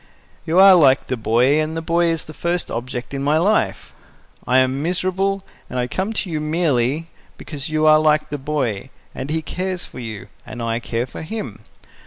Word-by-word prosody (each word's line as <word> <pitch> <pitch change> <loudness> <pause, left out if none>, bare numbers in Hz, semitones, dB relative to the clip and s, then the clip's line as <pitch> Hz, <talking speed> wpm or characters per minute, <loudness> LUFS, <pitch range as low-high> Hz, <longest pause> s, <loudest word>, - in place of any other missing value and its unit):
You 165 +3 +1
are 195 0 +9
like 140 -7 +5
the 130 - -2
boy, 125 +6 +2
and 155 +1 -3
the - - -2
boy 170 +1 +2
is 165 -2 -1
the 155 - -10
first 175 +2 -2
object 125 +2 -5
in 135 - -3
my 145 +3 +2
life. 205 +6 0 0.5
I 125 - +4
am 130 +1 +2
miserable, 185 +3 -1 0.3
and 125 - -5
I 125 - +1
came 190 - -2
to 210 -4 -3
you 155 -1 -2
merely 155 -1 0 0.3
because 145 0 -7
you 155 0 +1
are 155 0 +7
like 150 -1 +2
the 145 - -3
boy, 130 -6 -2 0.2
and 130 +2 -6
he 160 +1 -1
cares 185 +2 -3
for - - -11
you, 110 -4 -7 0.2
and 120 - -9
I 115 0 -1
care 120 0 -2
for 130 - -9
him. 160 - -6
155 Hz, 200 wpm, -20 LUFS, 130-170 Hz, 0.5 s, are